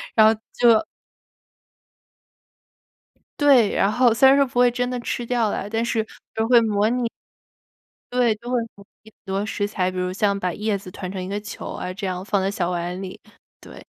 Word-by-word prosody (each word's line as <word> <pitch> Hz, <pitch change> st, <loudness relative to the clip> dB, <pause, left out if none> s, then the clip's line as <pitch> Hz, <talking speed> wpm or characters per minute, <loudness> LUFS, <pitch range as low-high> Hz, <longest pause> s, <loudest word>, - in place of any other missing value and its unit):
然 220 Hz, -1 st, +7 dB
后 -, -, -1 dB, 0.2 s
就 230 Hz, -2 st, +5 dB, 2.6 s
对， 270 Hz, -7 st, +5 dB
然 195 Hz, -, +3 dB
后 245 Hz, +1 st, +4 dB
虽 245 Hz, +4 st, +5 dB
然 270 Hz, -, +7 dB
说 280 Hz, -, +5 dB
不 245 Hz, -1 st, -3 dB
会 245 Hz, -, +6 dB
真 245 Hz, 0 st, -2 dB
的 250 Hz, -1 st, -3 dB
吃 240 Hz, -, -3 dB
掉 235 Hz, -3 st, 0 dB
啦， 200 Hz, -, -3 dB
但 225 Hz, +2 st, -1 dB
是 225 Hz, -2 st, -1 dB, 0.3 s
都 220 Hz, 0 st, -1 dB
会 245 Hz, -, +7 dB, 0.3 s
模 245 Hz, +2 st, -1 dB
拟 230 Hz, -, 0 dB, 1.0 s
对， 245 Hz, -3 st, +3 dB
都 240 Hz, +3 st, -8 dB
会 245 Hz, -2 st, +1 dB
模 200 Hz, -, -16 dB, 0.2 s
拟 220 Hz, -, -16 dB
很 -, -, -53 dB
多 195 Hz, +2 st, -2 dB
食 205 Hz, -2 st, -2 dB
材。 185 Hz, -3 st, -1 dB
比 185 Hz, -, -8 dB
如 180 Hz, 0 st, -1 dB
像 200 Hz, 0 st, +1 dB
把 180 Hz, -2 st, -2 dB
叶 210 Hz, -1 st, -1 dB
子 190 Hz, -1 st, -11 dB
团 185 Hz, 0 st, -6 dB
成 190 Hz, -2 st, -5 dB
一 -, -, -6 dB
个 200 Hz, +1 st, -3 dB
球 210 Hz, -, -8 dB
啊， 180 Hz, -, -5 dB
这 195 Hz, 0 st, -5 dB
样 185 Hz, 0 st, -4 dB
放 200 Hz, -1 st, 0 dB
在 190 Hz, -, 0 dB
小 180 Hz, -3 st, -2 dB
碗 175 Hz, +2 st, -3 dB
里， 185 Hz, -1 st, -8 dB, 0.4 s
对。 -, -, -13 dB
215 Hz, 220 characters per minute, -22 LUFS, 190-240 Hz, 2.6 s, 然